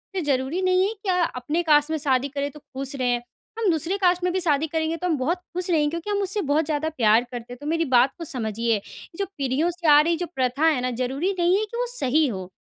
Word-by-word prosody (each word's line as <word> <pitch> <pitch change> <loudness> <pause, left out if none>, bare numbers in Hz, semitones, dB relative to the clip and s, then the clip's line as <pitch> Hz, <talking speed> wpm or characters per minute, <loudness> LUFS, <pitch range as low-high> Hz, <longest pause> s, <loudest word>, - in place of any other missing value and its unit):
ये 370 - 0
ज़रूरी 280 +4 -1
नहीं 370 +1 +3
है 435 - -3
कि 390 - -3
अ, 360 -1 +2
अपने 300 +8 -1
कास्ट 300 -1 +3
में 315 - 0
शादी 275 -2 +1
करें, 285 +1 -3
तो 300 - -13
खुश 275 0 -6
रहें। 245 -2 +1 0.4
हम 425 -4 +2
दूसरी 330 +5 -1
कास्ट 360 -2 +2
में 360 - +1
भी 375 - +1
शादी 315 -2 +1
करेंगे, 320 +1 -1
तो 360 - -2
हम 320 -4 +1
बहुत 320 +8 0 0.2
खुश 360 0 -2
रहेंगे 300 -2 +3
क्योंकि 335 +5 -5
हम 405 -1 0
उससे 390 +2 0
बहुत 315 +1 +2
ज़्यादा 310 +1 -1
प्यार 225 0 +4
करते 245 0 -7
हैं, - - -10
तो - - -8
मेरी 330 +1 +1
बात 255 +3 +5
को 335 - -6
समझिए। 230 -5 -1
ये 205 - -3 0.4
जो 395 - +1
पीढ़ियों 280 +5 0
से 345 -2 -4
आ 290 - +8
रही 335 +1 +1
जो 355 - -2
प्रथा 260 +4 +1
है 305 -6 +3
ना, 255 0 -1
ज़रूरी 270 +10 -2
नहीं 350 +2 +3
है 430 - 0
कि 470 +3 -8
वो - - 0
सही 300 - +2
हो। 190 -5 -5
310 Hz, 265 wpm, -24 LUFS, 260-355 Hz, 0.4 s, आ